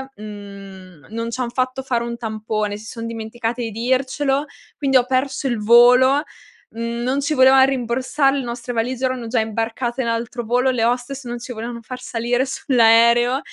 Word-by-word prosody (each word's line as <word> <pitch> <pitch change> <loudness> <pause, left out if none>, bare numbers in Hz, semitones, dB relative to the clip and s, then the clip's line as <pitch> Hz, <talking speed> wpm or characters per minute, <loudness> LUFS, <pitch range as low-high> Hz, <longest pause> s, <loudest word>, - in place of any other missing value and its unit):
mhmm, 195 -5 -11
non 230 +1 -4
ci 255 - -5
han 240 - -2
fatto 255 +1 -2
fare 240 -3 -1
un 235 0 -4
tampone, 215 -2 -3
si 215 - -12
son 230 0 -6
dimenticati 230 +1 -4
di 225 - -4
dircelo, 265 +4 0 0.3
quindi 270 -2 +3
ho 245 - +2
perso 265 +2 -1
il 240 -3 -1
volo; 250 +5 +6 0.5
non 235 +4 -2
ci 300 +2 -1
volevano 265 0 +6
rimborsare, 265 +2 0
le 270 - -2
nostre 245 +1 -5
valigie 250 +3 -1
erano 255 -3 -2
già 230 0 0
imbarcate 230 +3 -2
in 235 - -2
altro 235 +1 -3
volo, 245 +3 +1
le 240 -3 0
hostess 245 +3 -1
non 240 0 -5
ci 245 +1 -7
volevano 235 +1 -6
far 250 +2 -8
salire 245 +2 -1
sull'aereo, 240 0 +4
240 Hz, 175 wpm, -20 LUFS, 230-260 Hz, 0.5 s, volo